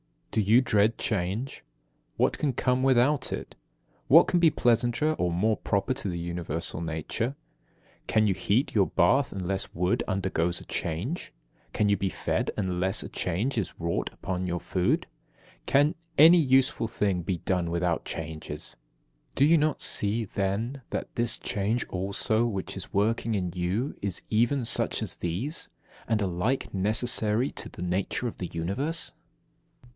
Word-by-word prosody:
18. 110 - +2
Do 100 - -5
you 120 +4 +7
dread 110 -2 +2
change? 105 +5 -2 0.5
What - - +1
can 145 -3 +1
come 125 +1 +1
without 130 +2 +3
it? - - -6 0.5
What 165 +6 +7
can 175 - +2
be 170 -1 +6
pleasanter 120 +4 +2
or 90 - 0
more 105 +6 +1
proper 100 +4 0
to 100 -7 -4
universal 85 -2 -4
nature? 85 - -3 0.7
Can 110 -1 +3
you 100 - +3
heat 105 +7 0
your 100 -4 +3
bath 125 +10 +3
unless 95 0 -3
wood 90 +2 +1
undergoes 90 -3 0
a - - -12
change? 90 - -3 0.4
Can 105 -1 +2
you 100 - +3
be 95 0 -1
fed - - -1
unless 95 0 -1
a - - -7
change 105 +10 -2
is 100 - -3
wrought 85 0 -1
upon 90 -1 -3
your 90 -1 -2
food? 90 -1 0 0.6
Can 145 +3 +4 0.2
any 165 +4 +8
useful 135 -4 +3
thing 100 -5 0
be 90 0 -2
done 90 -1 -1
without 85 0 0
changes? 80 -6 -5 0.6
Do 135 - +3
you 165 +3 +6
not 155 0 +1
see, 110 +3 +1
then, 105 +8 -2
that - - -4
this 120 -1 0
change 105 +4 -1
also 100 +4 0
which 100 -5 -3
is - - -5
working 110 +2 +1
in 90 -3 -1
you 95 +10 -1
is 100 -3 -2
even 120 +5 +2
such - - 0
as - - -3
these, 100 - -2 0.4
and 110 -2 +1
alike 100 +8 -1
necessary 110 +4 +1
to - - -3
the 90 - -8
nature 95 +7 -1
of 115 - -6
the 90 - -4
Universe? 110 - -3
105 Hz, 155 wpm, -27 LUFS, 90-125 Hz, 0.7 s, any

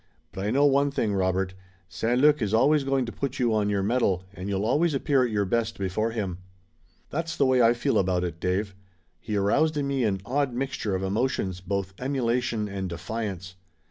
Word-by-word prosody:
But 95 - -5
I 105 - 0
know 140 +5 +3
one 140 0 +4
thing, 115 -7 -1
Robert. 95 -1 0 0.3
St. 120 +6 0
Luc 150 0 +5
is 105 0 +1
always 145 +5 +4
going 135 -1 +1
to 115 - -6
put 135 +1 -4
you 120 -3 +1
on 105 -1 +1
your 100 -1 0
mettle, 100 -4 +1
and 95 0 -6
you'll 100 +1 -1
always 150 +6 +2
appear 135 -1 +2
at 125 - 0
your 105 -2 0
best 115 +3 -1
before 100 +4 -1
him." 100 -6 -3 0.7
"That's 165 +2 -3
the 140 - +3
way 130 -1 +4
I 115 0 +6
feel 120 - +1
about 90 -1 +1
it, 85 -2 -4
Dave. 95 +3 -1 0.5
He 105 - -4
aroused 145 +11 +2
in 140 -1 0
me 135 -2 0
an 100 -4 +1
odd 135 0 0
mixture 125 -6 -2
of 95 - -2
emotions, 95 -3 -1
both 95 0 -3
emulation 120 -4 -1
and 95 -2 -4
defiance." 95 +1 -5
110 Hz, 205 wpm, -26 LUFS, 95-130 Hz, 0.7 s, I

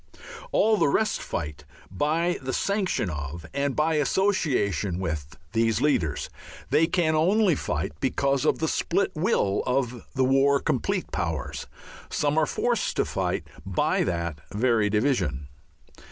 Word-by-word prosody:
All 220 - +3
the - - +3
rest 215 +10 +1
fight 75 -2 -5 0.3
by 160 - 0
the 130 0 -3
sanction 195 - 0
of 75 +2 -6
and 140 -1 -1
by 155 +1 +2
association 140 - +1
with 80 -4 -4 0.2
these 115 -1 +2
leaders. 90 - +1 0.4
They 160 - +4
can 165 -3 +1
only 185 +5 +3
fight - - -2
because 135 +2 +1
of 155 - +2
the 160 - -1
split 190 +5 0
will 155 - +1
of 125 -2 -1
the 130 -1 +3
war 135 +2 +4
complete - - -1
powers. - - -3 0.4
Some 145 0 0
are 155 - +2
forced 240 -1 0
to - - +1
fight - - -2 0.2
by - - +1
that 85 -4 -2
very 110 -1 +2
division. 95 - 0
135 Hz, 140 wpm, -26 LUFS, 95-160 Hz, 0.4 s, They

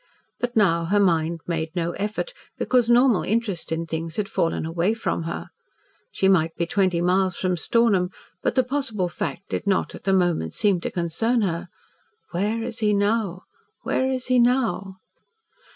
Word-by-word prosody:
But 245 0 -2
now 170 -6 +3
her 205 +5 +2
mind 165 -3 +2
made 165 0 -3
no 170 -1 0
effort, 210 - -3 0.2
because 245 -2 +2
normal 240 -3 +5
interest 210 -7 -2
in 165 +1 -1
things 165 0 -4
had 210 -2 -1
fallen 165 -7 -1
away 170 +6 0
from 225 - -2
her. - - -5 0.6
She 190 - +1
might 165 -4 +3
be 170 - -1
twenty 185 -2 +1
miles 185 +1 +2
from 185 -1 0
Stornham, 195 0 +2 0.3
but - - 0
the 260 - +4
possible 245 -8 -2
fact 175 +2 -5
did - - -3
not, 195 -2 +1
at - - -11
the 195 - +2
moment, 175 - +1
seem 195 -4 +2
to - - -2
concern 205 +8 0
her. 175 -3 -1 0.6
(Where 210 +6 -1
is 235 0 -5
he 210 -2 +2
now 205 -3 0 0.4
where 260 0 0
is 255 -1 -3
he 255 -1 +3
now?) 235 -6 +1
195 Hz, 170 wpm, -24 LUFS, 170-225 Hz, 0.6 s, normal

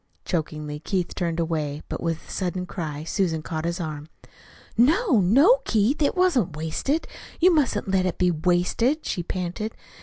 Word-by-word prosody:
Chokingly 150 -3 -3
Keith 180 +2 -2
turned 170 -1 -2
away, 155 -3 -2
but - - -5
with 165 -1 -3
a - - -11
sudden 180 -1 -2
cry 155 -5 -5
Susan 165 -2 -1
caught 160 0 -4
his 170 +2 -2
arm. 155 -3 -5 0.7
"No, 300 - +4
no, 280 - +5
Keith, 225 +7 +1
it 290 - +2
wasn't 335 - +2
wasted 160 - -1 0.3
you 360 +1 +6
mustn't 265 -11 +1
let 190 -1 +2
it 180 - -3
be 180 -1 +3
wasted," 180 - +1
she 175 - -2
panted. 180 +5 -4
180 Hz, 160 wpm, -24 LUFS, 160-235 Hz, 0.7 s, you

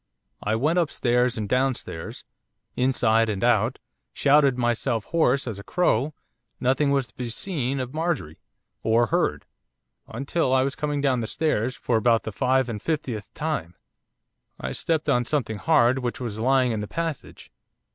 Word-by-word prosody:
I 105 +1 0
went 155 +10 +2
upstairs 125 -6 +1
and 105 -2 -2
downstairs, 125 -9 -2 0.5
inside 115 -3 +2
and 100 -1 -2
out 120 +1 +2 0.4
shouted 140 -2 +4
myself 120 -2 0
hoarse 140 -5 +2
as 105 -4 -4
a - - -9
crow 150 - +1 0.4
nothing 135 +3 +2
was 140 -3 +1
to - - -24
be 125 -2 -4
seen 135 0 -2
of 130 +1 -4
Marjorie, 160 - -2 0.4
or 115 +2 +3
heard; 110 - 0 0.6
until, 135 -1 0
as 130 - +4
I - - +2
was 135 +1 -1
coming 145 -1 -2
down 135 -3 +2
the 115 - -3
stairs 130 -4 0
for 120 - 0
about 115 0 +3
the 110 - -4
five 130 +3 +1
and 110 -4 -5
fiftieth 130 -9 -3
time, 100 - -3 0.8
I - - -4
stepped 160 -2 -1
on 125 -4 +3
something 120 -6 -2
hard 130 -4 +3
which 120 -2 -3
was 115 -4 -4
lying 130 +1 +3
in 110 - -2
the 105 - -4
passage. 165 0 -5
125 Hz, 165 wpm, -25 LUFS, 115-145 Hz, 0.8 s, shouted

